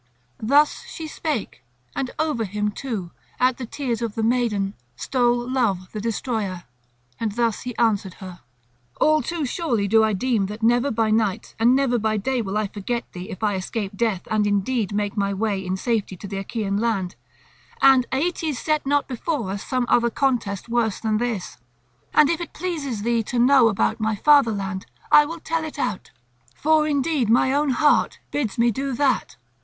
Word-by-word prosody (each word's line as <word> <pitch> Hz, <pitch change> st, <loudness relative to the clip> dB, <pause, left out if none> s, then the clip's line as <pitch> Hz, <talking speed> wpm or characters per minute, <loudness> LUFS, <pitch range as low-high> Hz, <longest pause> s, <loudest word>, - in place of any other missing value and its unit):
Thus 285 Hz, +7 st, +3 dB
she 320 Hz, -, -7 dB
spake; 300 Hz, -, -4 dB, 0.3 s
and 260 Hz, -, -2 dB
over 305 Hz, -7 st, 0 dB
him 210 Hz, +1 st, -2 dB
too, 205 Hz, -7 st, -5 dB, 0.3 s
at 255 Hz, 0 st, +3 dB
the 245 Hz, -, -5 dB
tears 245 Hz, -3 st, -3 dB
of 230 Hz, -3 st, -3 dB
the 225 Hz, -, -1 dB
maiden, 220 Hz, -4 st, +1 dB, 0.2 s
stole 240 Hz, -, +1 dB
Love 220 Hz, -8 st, 0 dB
the 215 Hz, -, -5 dB
destroyer, 215 Hz, -5 st, -2 dB, 0.6 s
and 225 Hz, -2 st, -1 dB
he -, -, -15 dB
thus 235 Hz, 0 st, 0 dB
answered 205 Hz, -5 st, +1 dB
her: 185 Hz, -2 st, -10 dB, 0.6 s
"All 310 Hz, 0 st, +4 dB
too 335 Hz, -2 st, -3 dB
surely 245 Hz, -, -1 dB
do 220 Hz, +2 st, +5 dB
I 220 Hz, -1 st, +2 dB
deem 220 Hz, -1 st, 0 dB
that 210 Hz, +3 st, -8 dB
never 240 Hz, +4 st, +3 dB
by 225 Hz, -3 st, +1 dB
night 215 Hz, -1 st, 0 dB
and 240 Hz, +3 st, +5 dB
never 260 Hz, -3 st, +2 dB
by 215 Hz, 0 st, 0 dB
day 250 Hz, +4 st, 0 dB
will 200 Hz, -1 st, -3 dB
I 215 Hz, -, +1 dB
forget 210 Hz, +4 st, -4 dB
thee 180 Hz, +3 st, -7 dB
if 195 Hz, -1 st, -7 dB
I 210 Hz, -1 st, +2 dB
escape 195 Hz, +2 st, -3 dB
death 210 Hz, -4 st, -1 dB
and 215 Hz, -1 st, +2 dB
indeed 205 Hz, +1 st, 0 dB
make 205 Hz, 0 st, -1 dB
my 200 Hz, -1 st, 0 dB
way 200 Hz, -1 st, -1 dB
in 185 Hz, 0 st, -2 dB
safety 215 Hz, -4 st, -1 dB
to 200 Hz, -, -8 dB
the 195 Hz, 0 st, -4 dB
Achaean 200 Hz, 0 st, -2 dB
land, 205 Hz, -5 st, -1 dB, 0.6 s
and 265 Hz, -2 st, +5 dB
Aeetes 310 Hz, 0 st, -1 dB
set 305 Hz, +2 st, -1 dB
not 285 Hz, 0 st, +2 dB
before 250 Hz, -, -3 dB
us 200 Hz, 0 st, -4 dB
some 255 Hz, -2 st, -1 dB
other 235 Hz, 0 st, +3 dB
contest 235 Hz, -7 st, -1 dB
worse 230 Hz, -4 st, 0 dB
than 215 Hz, -1 st, 0 dB
this. 230 Hz, -, -3 dB, 0.5 s
And 300 Hz, -, +5 dB
if 335 Hz, +3 st, 0 dB
it 340 Hz, -, -6 dB
pleases 290 Hz, -, -3 dB
thee 235 Hz, 0 st, +2 dB
to 250 Hz, -, -3 dB
know 250 Hz, 0 st, +6 dB
about 220 Hz, +1 st, +1 dB
my 220 Hz, 0 st, 0 dB
fatherland, 205 Hz, -8 st, +2 dB, 0.2 s
I 295 Hz, 0 st, +7 dB
will 335 Hz, +2 st, -6 dB
tell 325 Hz, 0 st, -2 dB
it 315 Hz, -1 st, -7 dB
out; 185 Hz, -, -3 dB, 0.5 s
for 310 Hz, 0 st, +3 dB
indeed 285 Hz, -4 st, +1 dB
my 250 Hz, +3 st, +4 dB
own 290 Hz, +1 st, +2 dB
heart 290 Hz, +3 st, +3 dB
bids 250 Hz, -9 st, -2 dB
me 235 Hz, 0 st, +3 dB
do 270 Hz, +4 st, -3 dB
that. 260 Hz, -1 st, 0 dB
230 Hz, 185 wpm, -23 LUFS, 205-270 Hz, 0.6 s, I